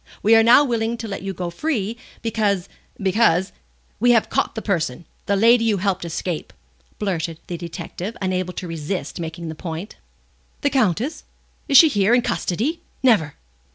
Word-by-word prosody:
We 220 +2 +6
are 225 - +7
now 235 +5 +7
willing 235 -3 -1
to 230 - -6
let 200 - -5
you 195 +1 -3
go 180 -1 -4
free, 225 - -2 0.3
because 205 -5 0 0.3
because 190 -2 +2 0.2
" - - -38
"We 240 +2 +5
have 230 - +2
caught - - 0
the 220 - -3
person, 170 -5 -1 0.2
the 200 - +2
lady 230 +3 +5
you 215 -3 +2
helped 195 0 -1
to 170 - -5
escape," 165 0 -4 0.4
blurted 170 -5 -2
out - - -35
the 175 - -4
detective, 175 +4 -6
unable 185 -1 -2
to 180 - -6
resist 165 +3 -4
making 165 0 -5
the - - -4
point. 165 +4 -7 0.6
"The 285 - +1
Countess? 255 - 0 0.4
Is 275 - +6
she 325 - +10
here, 210 -3 +3
in 245 - +2
custody? 275 - -1 0.2
Never!" 205 - +3
195 Hz, 180 wpm, -22 LUFS, 175-230 Hz, 0.6 s, she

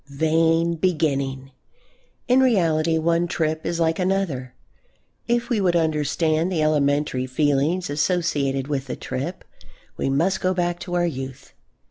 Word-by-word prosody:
Vain 165 +3 +2
beginning! 140 -6 -1 0.8
In 250 +1 +4
reality 165 -10 +2
one 170 +2 +1
trip 160 -1 -2
is 170 - -2
like 165 0 +1
another. 180 -9 -1 0.7
If 240 0 +1
we 220 -4 +2
would 180 -2 +2
understand 160 +1 +1
the 160 -4 0
elementary 145 -3 +1
feelings 145 +6 +1
associated 145 -4 0
with 140 -2 -3
a - - -2
trip 155 +8 -5 0.5
we - - -1
must 165 +8 +1
go 185 0 +1
back 175 -1 -1
to 175 -1 -5
our 175 0 +2
youth. 135 -5 -6
160 Hz, 135 wpm, -23 LUFS, 140-175 Hz, 0.8 s, In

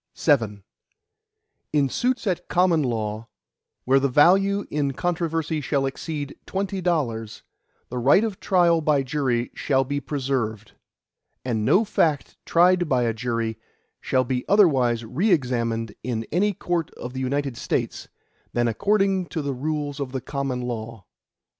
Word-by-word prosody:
VII 110 -10 +1 1.1
In 145 -2 +3
suits 250 - -1
at 180 -3 -1
common 175 -3 +3
law, 110 -3 -2 0.6
where 135 +2 +4
the 140 0 +1
value 195 +8 +4
in 145 -2 0
controversy 165 -1 -1
shall 140 0 0
exceed 145 +1 -4
twenty 195 0 -2
dollars, 120 -11 -2 0.5
the 125 - -3
right 140 - +5
of 215 -4 -3
trial 175 -3 +3
by 150 -3 +2
jury 130 -3 -1
shall 135 -2 +1
be 140 +2 -2
preserved, 125 -7 -2 0.7
and 115 -4 -1
no 195 - +4
fact 160 -8 0
tried 175 0 +4
by 125 -2 +2
a 115 -1 +1
jury 115 -1 -2 0.4
shall 130 -1 +1
be 125 0 -2
otherwise 130 - +4
re 160 - 0
examined 115 - 0
in 115 -2 -3
any 200 +6 +2
court 175 -3 -2
of 125 - -7
the 130 - -4
United 135 0 -1
States, - - -3 0.5
than 120 0 +1
according 195 - +1
to 155 +1 -4
the 140 -1 -2
rules 145 +1 -3
of 135 -2 -4
the 130 - -2
common 135 -3 -3
law. 115 -4 -5
140 Hz, 145 wpm, -24 LUFS, 120-170 Hz, 1.1 s, right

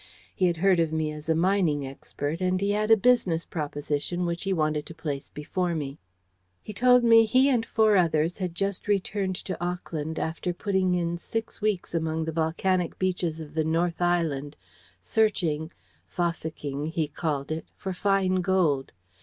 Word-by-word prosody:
He 185 - +2
had 170 -1 0
heard 185 +1 +3
of 165 -2 +1
me 160 -1 -1
as 150 +1 -8
a 160 - +4
mining 170 -5 +2
expert, 145 +4 -5
and 185 0 +1
he 200 +1 +1
had 210 +1 0
a 225 - +7
business 195 -8 +2
proposition 150 +3 -3
which 170 +2 -3
he 195 - 0
wanted 155 -3 0
to 165 - -9
place 150 -4 -4
before 170 +4 -2
me. 145 -1 -4 0.6
"He 215 - -7
told 250 +2 +5
me 230 -1 +7
he 255 +5 +4
and 245 -4 +2
four 220 -2 +3
others 165 -1 +2
had 180 -3 -3
just 195 +2 -2
returned 195 -1 0
to 180 -1 -5
Auckland 160 -3 -3
after 165 +2 -2
putting 190 -2 +1
in 170 -1 -1
six 225 +4 -5
weeks 210 -5 -1
among 160 -1 -1
the 160 - -2
volcanic 170 +2 0
beaches 180 -3 -1
of 155 -2 -9
the 160 0 +1
North 165 +2 0
Island, 160 -5 0 0.4
searching 170 -8 +1 0.4
'fossicking,' 155 -4 -3
he 160 -1 -1
called 145 -1 -3
it 160 +1 -4
for 190 -1 -4
fine 190 0 +1
gold. 175 -7 +1
170 Hz, 170 wpm, -27 LUFS, 155-190 Hz, 0.6 s, a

